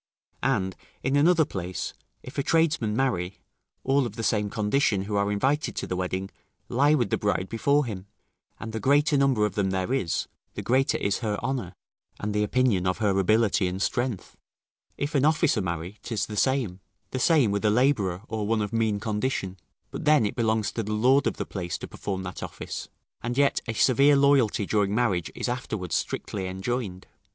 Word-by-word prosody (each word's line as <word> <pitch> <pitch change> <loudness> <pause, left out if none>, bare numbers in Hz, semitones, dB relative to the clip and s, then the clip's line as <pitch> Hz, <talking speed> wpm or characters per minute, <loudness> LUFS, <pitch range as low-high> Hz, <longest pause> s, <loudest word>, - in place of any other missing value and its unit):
And, 100 -8 0 0.3
in 135 +2 +1
another 160 +2 +5
place, 90 - -4 0.3
if 130 +3 -6
a - - +3
tradesman 155 -8 +1
marry, 100 -8 -1 0.5
all 135 -1 +2
of 110 - -10
the 115 - -4
same 105 -2 +1
condition, 105 -1 +1
who 105 +1 -3
are 100 0 +1
invited 135 +9 0
to - - -3
the 90 - -3
wedding, 95 +1 -3 0.4
lie 145 +5 +4
with 120 -8 0
the - - +1
bride 100 -2 0
before 140 +5 +2
him; 100 -4 -6 0.5
and 110 - -6
the 110 - -2
greater 145 +6 +3
number 135 -6 +3
of 105 - -2
them 100 -2 0
there 95 +5 -1
is, 85 -11 -1 0.3
the - - -4
greater 130 +2 +2
is 100 - 0
her 105 -3 -1
honour, 120 -8 -3 0.4
and 105 0 -3
the 105 - +1
opinion 105 -5 +2
of 95 - 0
her 100 -3 +1
ability 105 0 +3
and 90 +1 -3
strength: 120 -1 -2 0.6
if 145 +1 -3
an 140 -2 +2
officer 150 -7 +3
marry, 85 +2 -4
'tis 115 -4 -2
the 105 - -7
same, 120 -5 +1 0.3
the 130 - -2
same 140 -6 +4
with 100 +1 -1
a 105 - +4
labourer, 105 -6 +2
or 110 -2 -3
one 110 -1 +1
of 105 - -5
mean 110 -2 +1
condition; 105 -3 -2 0.4
but - - -6
then 150 -6 +5
it 100 - -2
belongs 110 -2 +1
to 115 - -2
the 105 -1 -4
lord 130 +6 +4
of - - -2
the - - -3
place 90 -3 -4
to - - -7
perform 95 -2 -4
that 90 -1 -6
office; - - -6 0.3
and 120 +2 -3
yet 140 0 +3
a 115 - -2
severe 140 +5 +5
loyalty 140 -7 +3
during 105 0 +1
marriage 100 -8 0
is - - -3
afterward 110 -8 -4
strictly 95 -2 -2
enjoined. 95 0 -3
110 Hz, 195 wpm, -26 LUFS, 100-130 Hz, 0.6 s, another